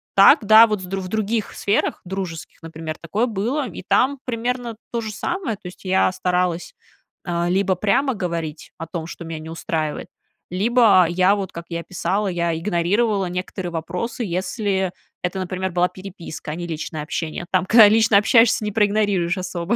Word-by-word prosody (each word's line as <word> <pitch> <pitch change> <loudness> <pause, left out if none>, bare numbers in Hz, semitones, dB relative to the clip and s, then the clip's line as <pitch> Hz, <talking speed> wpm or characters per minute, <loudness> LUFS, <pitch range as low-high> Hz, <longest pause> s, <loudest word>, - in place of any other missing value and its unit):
так, 200 +2 +7
да, 220 +2 +8
вот 210 -3 -2
с - - -5
в 190 0 -4
других 215 +2 -2
сферах 205 - 0
дружеских, 180 -4 -6
например, 160 -1 -7
такое 200 +8 0
было, 245 +6 -2
и 190 - -8
там 265 +8 +2
примерно 245 0 -3 0.2
то 235 - -1
же 220 -1 -5
самое. 330 - -3
То 185 - -11
есть 180 - -16
я 185 0 +3
старалась 180 -2 -1 0.5
либо 180 +2 +1
прямо 215 +9 +1
говорить 165 -5 -4
о 165 - -5
том, 165 0 -5
что 170 - -8
меня 165 -1 -6
не 160 +1 -9
устраивает, 160 -2 -3 0.4
либо 205 -1 +4
я 185 +3 +3
вот, 195 -3 -4
как 170 0 -7
я 170 -1 -3
писала, 190 +3 -1
я 170 -2 -1
игнорировала 195 +4 +1
некоторые 180 0 -4
вопросы, 180 +9 -4
если 190 +1 -1 0.3
это, 180 +2 -2
например, 185 0 -3
была 175 +1 +2
переписка, 180 -5 -8
а 155 - -4
не 175 0 -5
личное 160 -1 -5
общение. 160 +2 -4
Там, 185 -1 +1
когда 220 +1 +8
лично 220 -1 +5
общаешься, 225 +1 +4
не 210 - -2
проигнорируешь 205 -4 +1
особо. 180 +2 -2
185 Hz, 170 wpm, -21 LUFS, 170-215 Hz, 0.5 s, да